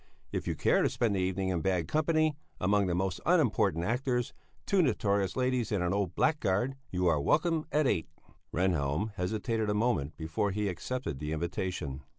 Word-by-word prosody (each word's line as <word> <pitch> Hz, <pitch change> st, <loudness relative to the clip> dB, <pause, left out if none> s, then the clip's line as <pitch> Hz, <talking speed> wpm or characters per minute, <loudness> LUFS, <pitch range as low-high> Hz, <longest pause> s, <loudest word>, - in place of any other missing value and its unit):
If -, -, -3 dB
you -, -, 0 dB
care -, -, +3 dB
to -, -, +3 dB
spend 110 Hz, -4 st, 0 dB
the -, -, 0 dB
evening 95 Hz, +1 st, 0 dB
in 90 Hz, -3 st, 0 dB
bad 90 Hz, -2 st, 0 dB
company, 155 Hz, -, +2 dB, 0.2 s
among 100 Hz, +1 st, +2 dB
the 90 Hz, -, 0 dB
most 95 Hz, 0 st, -1 dB
unimportant 110 Hz, -, +2 dB
actors, 125 Hz, +2 st, 0 dB, 0.3 s
two 195 Hz, -2 st, +3 dB
notorious 100 Hz, -, +1 dB
ladies 125 Hz, -3 st, 0 dB
and 100 Hz, -4 st, +1 dB
an 90 Hz, +1 st, 0 dB
old 100 Hz, -3 st, -1 dB
blackguard, 135 Hz, -5 st, +1 dB
you 90 Hz, 0 st, -1 dB
are 80 Hz, -4 st, +3 dB
welcome 160 Hz, -, +1 dB
at 150 Hz, 0 st, +2 dB
eight." 100 Hz, -10 st, +1 dB, 0.4 s
Rehnhjelm 90 Hz, +2 st, 0 dB
hesitated 110 Hz, +3 st, -1 dB
a 105 Hz, -, +1 dB
moment 105 Hz, -, 0 dB
before 80 Hz, +5 st, -1 dB
he 105 Hz, +1 st, -1 dB
accepted 95 Hz, -, -4 dB
the 75 Hz, +2 st, -3 dB
invitation. 80 Hz, -3 st, -3 dB
100 Hz, 175 wpm, -30 LUFS, 90-125 Hz, 0.4 s, care